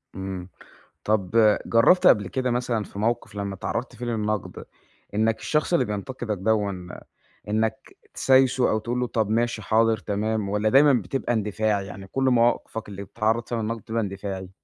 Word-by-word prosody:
إمم، 95 -1 -6 0.5
طَب 105 +1 +3
جرّبت 180 +11 +5
قَبل 100 -4 +5
كده 130 +2 -1
مثلًا 120 -2 -1
في 100 - -9
مَوقِف 115 -1 -1
لمّا 100 -1 -4
اتعرّضت 115 +6 -4
فيه 120 - -6
للنقد، 105 -3 -3 0.5
إنّك 110 +1 +1
الشخص 150 +7 0
اللي 170 - +3
بينتقدك 105 +1 -4
دَوًّا 100 -3 -1 0.6
إنّك 110 +5 -2 0.2
تسايسه 130 -1 +3
أو 110 - +1
تقول 120 +3 -3
له 125 - 0
طَب 110 -2 -1
ماشي، 115 0 0
حاضر، 110 +2 +2
تمام، 105 0 -2
والّا 105 +1 +1
دايمًا 140 +3 +6
بتبقى 130 0 -1
اندفاعي، 105 -2 0
يعني 95 +1 -9
كل 135 +7 -2
مواقفك 120 -3 +1
اللي 100 -1 -7
بتتعرض 110 +3 -1
فيها 115 -2 -1
للنقد 115 +1 -3
بتبقى 115 +1 -2
اندفاعي؟ 100 -2 -5
110 Hz, 160 wpm, -24 LUFS, 100-120 Hz, 0.6 s, دايمًا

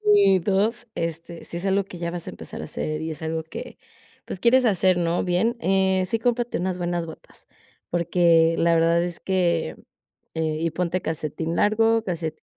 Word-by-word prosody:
Y 195 - +5
2, 210 +6 0
este, 165 -1 -5
si 170 - -6
es 175 - -5
algo 195 +1 +2
que 185 -2 -11
ya 170 0 -3
vas 175 -1 -6
a - - -3
empezar - - -8
a - - -5
hacer 155 0 -4
y 160 - -3
es 160 0 -7
algo 160 0 -2
que 160 - -9 0.5
pues - - -6
quieres 250 +4 +4
hacer, 185 -4 +3
¿no?, 170 0 0
bien, 185 +7 +1
eh, 190 0 +2
sí, 225 +5 -1
cómprate 240 +1 0
unas 180 0 -1
buenas 175 -1 -2
botas, 160 - -13 0.4
porque 170 -1 +3
la 170 0 +3
verdad 165 +1 +3
es 175 -1 -5
que, 175 -3 0 0.6
eh 160 -1 -1
y 165 - +1
ponte 180 +2 -1
calcetín 160 +1 -3
largo, 225 +3 +3
calcetín, 170 -5 -4
175 Hz, 185 wpm, -24 LUFS, 165-195 Hz, 0.6 s, Y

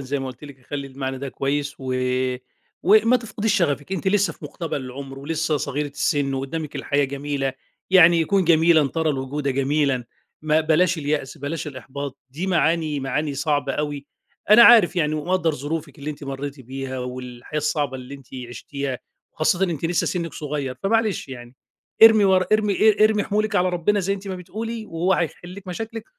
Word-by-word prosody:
زَيّ 135 +1 -3
ما 135 - -4
قُلت 130 +2 -9
لِك، 135 -3 -13
خلّي 140 -1 -4
المعنى 135 0 -5
ده 140 +1 -5
كويس 140 +2 -2
و 130 -1 -3 0.9
وما 215 +5 +5
تفقديش 225 -2 -2
شغفِك 145 -2 0
أنتِ 190 0 -1
لسه 195 -3 +2
في 150 - -14
مُقتبل 150 0 -4
العمر، 135 +1 -8
ولسه 160 +2 -1
صغيرة 145 +1 -2
السِن 140 0 0
وقدّامِك 140 +3 -4
الحياة 145 0 +1
جميلة، 140 0 -2 0.4
يعني 170 -3 +6
كُن 195 +2 +2
جميلًا 160 -2 +4
ترى 160 +1 0
الوجود 140 +1 -3
جميلًا، 135 -1 +1 0.4
ما 155 0 +3
بلاش 165 +2 +2
اليأس، 145 -2 -2
بلاش 145 +4 -4
الإحباط، 140 0 -7
دي 160 +8 -4
معاني 165 -4 +1
معاني 145 +2 -2
صعبة 145 0 0
أوي، 145 0 -3 0.4
أنا 215 +3 +9
عارف 225 -7 +7
يعني 155 -3 +1
ومقدّر 165 +1 0
ظروفِك 145 +1 -5
اللي 145 +2 -4
أنتِ 145 -1 -9
مرّيتِ 140 +1 -5
بيها 130 +1 -6
والحياة 125 +2 -6
الصعبة 150 -2 -1
اللي 130 +2 -9
أنتِ 135 -2 -13 0.2
عشتيها 140 +1 -5 0.3
وخاصةً 175 +4 +1
أنتِ 170 -5 -3
لسه 170 +1 +1
سِنِّك 170 -2 -2
صغيّر، 145 -3 -4
فمعلش 215 -5 +1
يعني 120 -1 -10 0.5
ارمي 220 -2 +9
ورا 190 -1 +4
ارمي 215 -1 +3 0.2
ا 215 0 +3
ارمي 215 -1 +2
حمولِك 215 +1 -1
على 180 +1 +3
ربنا 180 +4 +1
زَيّ 195 +1 0
أنتِ 200 0 -8
ما 190 - -3
بتقولي 220 +5 -6
وهو 170 +3 0
هيحلّ 175 +1 -2
لِك 200 0 -11
مشاكلِك 225 +4 -5
150 Hz, 175 wpm, -23 LUFS, 140-180 Hz, 0.9 s, أنا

